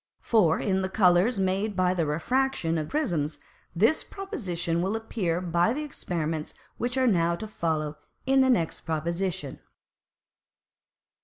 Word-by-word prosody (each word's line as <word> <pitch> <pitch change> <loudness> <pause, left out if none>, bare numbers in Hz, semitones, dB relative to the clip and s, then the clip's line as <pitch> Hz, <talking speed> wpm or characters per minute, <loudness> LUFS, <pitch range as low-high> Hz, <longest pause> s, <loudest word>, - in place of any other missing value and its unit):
For 185 -9 +3
in 190 -1 0
the 190 - -2
Colours 190 +3 +4
made 195 +2 0
by 180 0 +2
the 170 -4 0
Refraction 165 - 0
of 155 - -4
Prisms, 170 - -1 0.4
this 225 - +3
Proposition 180 - -3
will 195 +4 0
appear 200 -6 -1
by 175 +3 +1
the 300 +3 -3
Experiments 165 - -3 0.2
which 245 +2 -2
are 260 - +3
now 170 -7 +3
to 195 - -6
follow 155 -7 -2 0.3
in 265 0 +4
the 260 - +4
next 170 -10 +1
Proposition. 170 -1 -3
185 Hz, 140 wpm, -27 LUFS, 165-225 Hz, 0.4 s, Colours